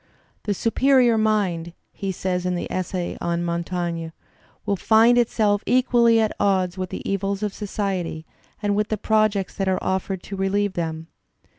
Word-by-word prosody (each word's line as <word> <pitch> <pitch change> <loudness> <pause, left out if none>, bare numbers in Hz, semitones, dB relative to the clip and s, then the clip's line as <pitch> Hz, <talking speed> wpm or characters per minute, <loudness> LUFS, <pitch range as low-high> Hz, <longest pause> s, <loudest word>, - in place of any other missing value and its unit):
"The 205 -1 0
superior 250 +2 +3
mind," 200 -6 0 0.2
he 195 -1 -4
says 180 0 -2
in 180 - 0
the 175 - -3
essay 185 -1 -3
on 170 0 -1
Montaigne, 170 -1 -2 0.6
"will 200 - +1
find 225 +5 +5
itself 215 -4 +2
equally 240 -2 +4
at 220 -1 0
odds 185 -3 +1
with 185 -1 -4
the - - -6
evils 195 +1 -1
of 205 -2 -2
society 190 -6 -3 0.4
and 205 -1 +1
with 210 0 +1
the 215 - -2
projects 215 -2 +1
that 195 -2 0
are 185 - +1
offered 190 0 -2
to 195 - -7
relieve 195 +1 0
them." 160 -2 -3
195 Hz, 160 wpm, -23 LUFS, 180-215 Hz, 0.6 s, find